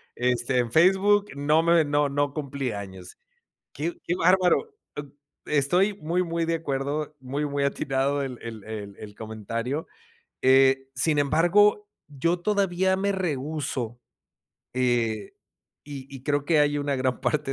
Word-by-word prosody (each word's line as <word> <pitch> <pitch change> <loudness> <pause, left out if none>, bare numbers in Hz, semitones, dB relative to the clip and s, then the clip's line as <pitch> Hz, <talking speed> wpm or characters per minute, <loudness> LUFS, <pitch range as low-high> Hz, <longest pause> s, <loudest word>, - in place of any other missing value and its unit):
este, 125 +1 0
en 120 -2 -1
Facebook 195 +5 +4
no 150 +3 +2
me 170 -2 +4
no 145 0 +1
no 145 0 0
cumplí 140 -4 -3
años. 95 -3 -8 0.6
Qué 165 +5 -3
qué 175 - 0
bárbaro, 185 - +3 0.2
b 145 - -4 0.4
estoy 175 +8 +2
muy, 180 0 -1
muy 165 0 -2
de 165 - 0
acuerdo, 145 0 -3
muy, 140 +3 -3
muy 140 0 -2
atinado 140 +1 0
el 130 -3 -5
el 110 -3 -7
el 105 -1 -10
comentario. 115 +7 -4 0.6
Eh, 135 0 +4
sin 150 +3 +2
embargo, 180 +8 +3 0.2
yo 165 +5 -1
todavía 190 -1 +1
me 200 +1 0
rehúso, 145 - -3 0.8
eh, 120 -4 0 0.5
y 140 -2 -8
y 130 - -9
creo 145 0 0
que 155 -2 +3
hay 145 0 +2
una 145 -1 -1
gran 130 -1 -1
parte 150 -3 -1
145 Hz, 140 wpm, -25 LUFS, 130-170 Hz, 0.8 s, Facebook